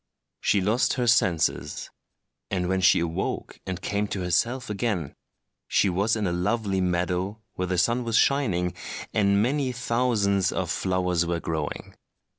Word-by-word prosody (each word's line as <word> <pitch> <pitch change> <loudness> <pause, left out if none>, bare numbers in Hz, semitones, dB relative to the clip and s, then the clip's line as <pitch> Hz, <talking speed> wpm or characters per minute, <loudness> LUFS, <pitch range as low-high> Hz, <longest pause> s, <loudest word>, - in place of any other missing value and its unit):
She 100 - +2
lost 110 +6 +2
her 125 -1 0
senses; 90 -8 +1 0.6
and 90 -2 -1
when 95 +1 0
she 90 - +5
awoke 85 +3 -3
and 95 -1 -3
came 100 +1 -1
to 100 - -4
herself 115 +9 0
again, 100 - -2 0.5
she 100 - +3
was 100 +6 +1
in 110 -2 -1
a 90 - 0
lovely 95 +2 0
meadow 90 +4 -1
where 90 - -3
the 90 0 -1
sun 115 +8 +2
was 115 -1 +1
shining 95 -11 +2 0.4
and 100 -1 +3
many 135 +1 0
thousands 115 -6 +1
of 90 -2 -2
flowers 90 -2 0
were 85 0 -1
growing. 80 -3 -4
95 Hz, 150 wpm, -26 LUFS, 90-115 Hz, 0.6 s, she